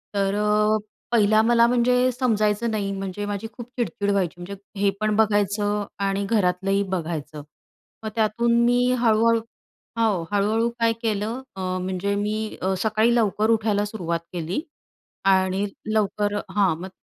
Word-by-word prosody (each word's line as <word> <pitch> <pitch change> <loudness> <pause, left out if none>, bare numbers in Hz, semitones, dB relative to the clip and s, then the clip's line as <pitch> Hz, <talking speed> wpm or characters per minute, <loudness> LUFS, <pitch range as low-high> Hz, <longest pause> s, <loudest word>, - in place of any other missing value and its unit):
तर 195 0 +1
अ, 210 +1 +2 0.3
पहिला 215 -2 +4
मला 235 +1 +4
म्हणजे 250 +1 +3
समजायचं 225 -2 +1
नाही. 200 -2 -2
म्हणजे 195 +1 -4
माझी 205 +1 -4
खूप 240 -1 -9
चिडचिड 205 -2 -1
व्हायची. 190 -4 0
म्हणजे 200 +3 -6 0.3
हे 200 - +4
पण 215 0 +1
बघायचं 205 -1 +1 0.2
आणि 195 0 0
घरातलंही 195 -1 +1
बघायचं. 155 -4 -4 0.6
मग 220 - -3
त्यातून 235 +2 +2
मी 245 +1 +3
हळूहळू 230 0 +3 0.6
हो, 210 -6 +2
हळूहळू 215 +3 +2
काय 230 0 +3
केलं 220 +3 -2
अ, - - -6 0.2
म्हणजे 185 +2 -2
मी 215 +1 -2
अ, 190 +1 +1
सकाळी 220 +2 +2
लवकर 215 -1 +2
उठायला 215 -2 +2
सुरुवात 170 -6 -3
केली 175 - -2 0.7
आणि 190 +1 +2 0.3
लवकर 205 -1 0 0.2
हां, 195 -5 +3
मग 185 - -6
210 Hz, 140 wpm, -23 LUFS, 195-225 Hz, 0.7 s, पहिला